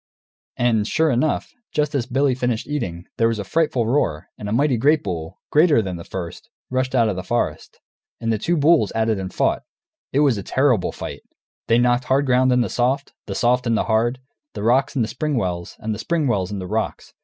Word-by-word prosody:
And, 115 -3 +2
sure 160 +3 +2
enough, 130 +5 0 0.2
just 150 0 0
as 125 -5 -1
Billy 135 +1 +2
finished 125 -3 -1
eating, 95 - -3
there 115 - +4
was 115 -1 0
a 105 - -3
frightful 135 - +1
roar, 95 - 0
and 105 - -6
a - - -3
mighty 135 +3 +2
great 145 +7 +3
bull, 80 -4 -5
greater 155 -3 +5
than 95 -4 -2
the 85 - -8
first, 85 -2 -7 0.2
rushed 130 0 0
out 115 -3 +4
of 105 - -1
the 95 - -3
forest. 90 -5 -2 0.4
And 115 -1 0
the 110 - -1
two 170 +9 0
bulls 150 -7 +4
at 110 0 +1
it 110 -3 +1
and 95 -1 -5
fought. - - +1 0.5
It 140 - +2
was 135 -8 +3
a - - -3
terrible 130 -1 +1
fight! - - -7 0.5
They 115 - +4
knocked 120 +1 +2
the - - -15
hard 135 +2 +2
ground 130 0 +3
into 125 -1 +3
soft, 130 +3 -1
the - - -4
soft 125 +1 +2
into 115 -1 +2
hard, 115 +3 +1 0.4
the 105 - -4
rocks 130 +6 +2
into 120 -5 +1
spring 150 +2 -2
wells, 90 -5 -3
and 110 0 -3
the 105 - -6
spring 165 +4 0
wells 100 -5 0
into 95 -3 -4
rocks. 110 +4 -3
120 Hz, 215 wpm, -22 LUFS, 105-135 Hz, 0.5 s, greater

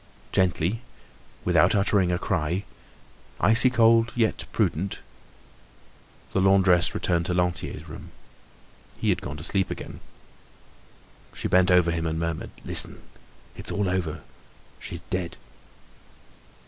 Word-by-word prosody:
Gently, 95 +4 0 0.6
without - - +3
uttering 100 -2 +2
a 90 - 0
cry, 90 0 -2 0.8
icy 115 +4 +5
cold 115 -1 +4
yet 115 -3 0
prudent, 95 +5 -1 1.4
the 95 - +1
laundress 95 -3 +4
returned 85 -1 0
to 90 - -1
Lantier's 90 -1 -2
room. - - -10 0.9
He - - -1
had - - +1
gone 70 +3 -6
to 75 - -7
sleep 95 -2 0
again. - - -7 1.4
She - - -3
bent 95 0 +3
over 90 -2 +4
him 85 0 -2
and 80 0 -2
murmured: 85 -1 -3 0.2
"Listen, - - +4 0.5
it's - - -2
all 100 -1 -1
over, 85 -4 -2 0.6
she's 85 - -7
dead." 90 -2 -3
90 Hz, 120 wpm, -25 LUFS, 85-100 Hz, 1.4 s, icy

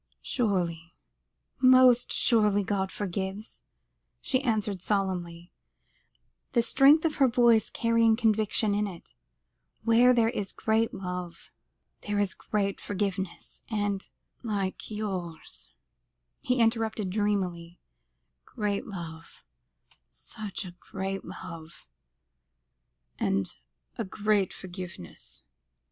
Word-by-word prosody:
"Surely, 175 -7 -1 0.6
most 255 -1 +6
surely, 210 -3 +3
God 190 -1 -1
forgives," 195 +2 -4 0.6
she 260 -1 0
answered 210 -7 -1
solemnly, 180 -4 -2 1.0
the 235 -2 +4
strength 290 +7 +5
of 315 - 0
her 270 - +5
voice 235 -2 +4
carrying 230 -1 +3
conviction 220 -1 +2
with 210 0 +1
it; - - -16 0.7
"where 235 +2 +6
there 230 -2 +4
is 205 -5 -2
a - - -26
great 225 +1 +1
love, 180 -2 -6 0.6
there 205 0 0
is 205 -2 +1
great 200 -2 -2
forgiveness, 195 -2 -4
and 205 -3 -2 0.2
" - - -53
"Like 200 -5 -3
yours," 190 -6 -5 0.7
he 250 0 0
interrupted 225 -4 +1
dreamily; 185 -4 -1 0.6
"great 205 - -3
love 165 -5 -9 0.7
such 215 -2 -7
a 175 -1 -10
great 195 0 -4
love 165 -1 -10 1.3
and 95 -1 0 0.4
a - - +1
great 205 0 +1
forgiveness. 180 - -9
205 Hz, 100 wpm, -28 LUFS, 185-225 Hz, 1.3 s, most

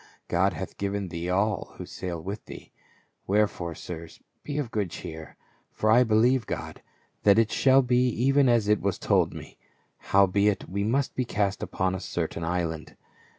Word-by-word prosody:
God - - +2
hath - - -7
given 100 -1 -2
thee 85 +1 -4
all 100 +2 0
who - - -6
sail 90 -2 -5
with 100 +6 -6
thee; - - -11 0.6
wherefore, 95 -5 0
sirs, 85 0 -8 0.2
be 145 -1 -5
of 140 -6 -2
good 105 -4 -1
cheer; 80 -1 -8 0.3
for 110 - 0
I 120 +3 +6
believe 115 +1 +3
God, - - -5 0.4
that 100 0 +5
it 115 -1 +3
shall 135 0 +4
be 125 0 +3
even 135 +3 +3
as 115 -3 +3
it 105 0 +3
was 100 -2 -1
told - - +2
me. - - -11 0.4
Howbeit, 100 +1 +2
we 100 +2 -2
must 130 +6 0
be 130 - -1
cast 100 -4 -1
upon 95 0 -1
a 95 - -3
certain 85 -2 -3
island." 80 -2 -3
100 Hz, 170 wpm, -27 LUFS, 90-115 Hz, 0.6 s, I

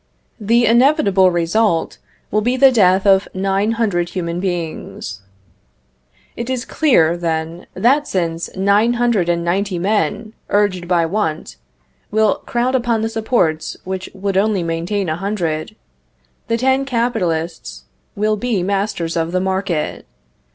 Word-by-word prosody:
The 230 +3 +3
inevitable 230 - +4
result 175 +1 0 0.3
will 215 - +2
be 245 +4 0
the 270 0 +6
death 190 -4 +3
of 195 -1 +4
nine 195 +3 0
hundred 200 -7 0
human 170 -2 -3
beings. 170 - -4 1.1
It 235 +1 -5
is 255 -1 -2
clear, 170 - +3
then, 165 0 -3
that 280 +5 +2
since 170 -3 -2
nine 200 +5 +3
hundred 235 -7 +1
and 170 0 0
ninety 190 +2 -1
men, 205 +2 -1 0.2
urged 195 -4 +1
by 170 -2 +2
want, 160 - -3 0.5
will 215 -1 +2
crowd 245 +2 0
upon 235 -3 +1
the 225 - 0
supports 220 -8 -1
which 190 0 -5
would 195 0 -2
only 200 -2 +1
maintain 170 +4 -2
a 155 0 -2
hundred, 180 -2 -3 0.7
the 230 - +1
ten 265 +2 +2
capitalists 215 -11 -2 0.3
will 215 +1 0
be 220 -5 -1
masters 195 -4 -2
of 165 0 -1
the 185 - +1
market. 190 -4 -2
195 Hz, 135 wpm, -18 LUFS, 170-225 Hz, 1.1 s, the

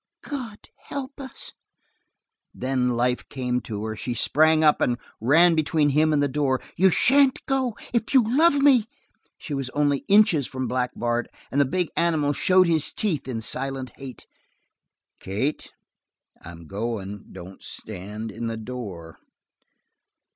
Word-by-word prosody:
"God 250 -7 -6 0.2
help 275 0 -7
us!" 265 - -7 1.0
Then 130 -1 0
life 125 +1 0
came 125 -2 -2
to 105 -1 -5
her; 110 0 -4
she 120 +3 -4
sprang 155 +5 +3
up 150 -1 +4
and 120 -1 +1 0.2
ran 165 +9 +5
between 155 -1 +2
him 155 +3 +3
and 145 -1 +2
the - - +2
door. 135 -2 0 0.2
"You 190 +2 +5
shan't 265 - +4
go. 260 -4 -1 0.2
If 235 -1 0
you 265 -3 +6
love 285 +8 +4
me!" 275 -6 +4 0.5
She 150 - -7
was 135 -2 -3
only 145 -1 +2
inches 200 - +4
from 130 -1 -4
Black 125 -1 -1
Bart, 120 0 -1 0.2
and 140 - +2
the - - +4
big 180 +4 -1
animal 155 -4 +1
showed 185 +5 +4
his 160 -3 +1
teeth 165 -12 -1
in 115 -4 -3
silent 130 +2 -2
hate. 135 -2 -10 0.9
"Kate, 110 +11 -3 0.7
I'm 85 0 -11
goin'. 100 +1 -5
Don't 95 +2 -11
stand 105 +2 -7
in 115 +3 -5
the 115 0 -3
door." 105 -9 -8
135 Hz, 145 wpm, -24 LUFS, 120-175 Hz, 1.0 s, you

